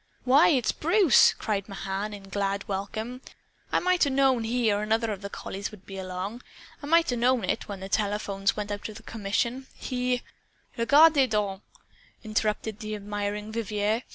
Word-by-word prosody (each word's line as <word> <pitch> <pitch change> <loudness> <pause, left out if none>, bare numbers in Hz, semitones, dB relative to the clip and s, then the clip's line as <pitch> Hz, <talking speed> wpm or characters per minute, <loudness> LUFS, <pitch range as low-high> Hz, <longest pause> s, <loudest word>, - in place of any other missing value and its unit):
"Why, 270 +5 +6
it's 260 -8 +3
Bruce!" 345 - +5
cried 205 -2 -3
Mahan 195 +2 -4
in 205 -1 -9
glad 200 0 -2
welcome. 215 +6 -4 0.5
"I - - +3
might 365 0 +2
'a' 285 - +3
known 265 -3 +2
he 235 -1 +1
or 205 - 0
another 220 +1 0
of 200 -2 -5
the 200 - -6
collies 200 0 -5
would 210 -3 -15
be 195 -1 -7
along. 190 +5 -5 0.4
I 285 - -7
might 335 -1 +4
'a' - - 0
known 245 -1 +2
it, 185 - -2
when 200 -3 -7
the 190 - -5
telephones 200 -1 0
went 205 0 -3
out 205 +1 -4
of 215 +1 -11
commission. 230 +5 -2
He 250 -1 -2 0.3
" - - -36
"Regardez 280 +3 +5
donc!" 205 -3 -1 0.6
interrupted 215 -1 -1
the 215 0 -4
admiring 205 +1 -4
Vivier. 215 0 -1
215 Hz, 175 wpm, -27 LUFS, 200-250 Hz, 0.6 s, Why